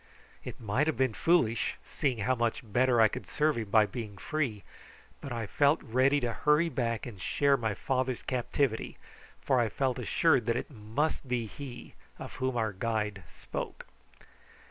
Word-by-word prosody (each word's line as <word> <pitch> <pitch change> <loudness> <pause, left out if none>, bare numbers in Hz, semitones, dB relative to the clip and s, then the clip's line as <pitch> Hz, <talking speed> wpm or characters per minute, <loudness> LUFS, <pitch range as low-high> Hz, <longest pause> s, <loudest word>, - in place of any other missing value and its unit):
It - - -8
might 120 +7 0
have 160 - 0
been 130 -3 +2
foolish, 115 - +2
seeing 135 -5 -1
how 130 - +3
much 120 -2 0
better 120 +2 +2
I 110 - +8
could - - -7
serve 150 0 +1
him 110 -3 -4
by 110 0 +5
being 105 -3 -6
free, 125 -7 -2 0.6
but 140 - -7
I 115 -2 -2
felt 145 +8 +3
ready 130 +5 +3
to 120 -2 -1
hurry 150 +5 +3
back 120 -5 -2
and 105 -7 -9
share 140 +7 +3
my 110 -5 -1
father's 130 +1 -1
captivity, 125 -1 -1 0.4
for 130 -3 +2
I 115 -2 +2
felt 130 0 -1
assured 140 -9 +2
that 115 0 +2
it 125 - -5
must 130 +6 -2
be 125 -2 -1
he 125 +2 -9 0.2
of - - -8
whom 130 -1 -1
our 110 -3 0
guide 105 -1 -2
spoke. - - -6
120 Hz, 170 wpm, -30 LUFS, 110-140 Hz, 0.6 s, I